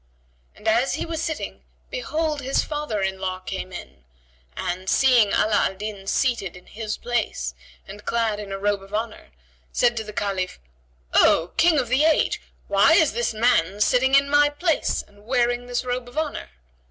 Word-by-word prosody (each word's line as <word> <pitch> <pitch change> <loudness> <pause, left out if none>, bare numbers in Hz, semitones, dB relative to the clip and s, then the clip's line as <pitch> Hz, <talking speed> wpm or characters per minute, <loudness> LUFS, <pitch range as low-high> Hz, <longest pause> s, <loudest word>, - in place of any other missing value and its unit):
And 215 - -10
as 235 +4 +3
he - - -3
was 325 -1 -4
sitting 320 -2 -4 0.3
behold, 320 -11 -2
his 270 +1 +1
father 295 -9 -3
in 190 0 -2
law 185 -1 -2
came 185 0 -6
in 70 - -10 0.5
and, 185 +2 -3
seeing 250 -5 +5
Ala 215 +2 +1
al 190 - -7
Din 200 -1 -7
seated 215 -7 0
in 180 - -16
his 215 -1 -5
place 220 - -2 0.3
and 210 +1 -10
clad 225 -3 0
in 205 -2 -7
a 195 - -3
robe 205 0 0
of 195 +2 -7
honour, 220 0 -4 0.4
said 240 -1 +2
to 220 - -1
the 210 - -8
Caliph, 195 -3 -2 0.6
"O 165 +2 +4
King 335 -2 +4
of 255 -4 +1
the 260 +4 +3
age, 315 0 +2 0.3
why 200 +11 +5
is 320 -3 +4
this 235 +1 0
man 215 -5 +2
sitting 260 +5 +3
in 275 0 +5
my 290 +1 +4
place 315 +2 0
and 205 0 -22
wearing 245 0 0
this 245 0 -2
robe 245 0 -3
of 245 - -15
honour?" 310 -2 -3
230 Hz, 180 wpm, -23 LUFS, 200-270 Hz, 0.6 s, seeing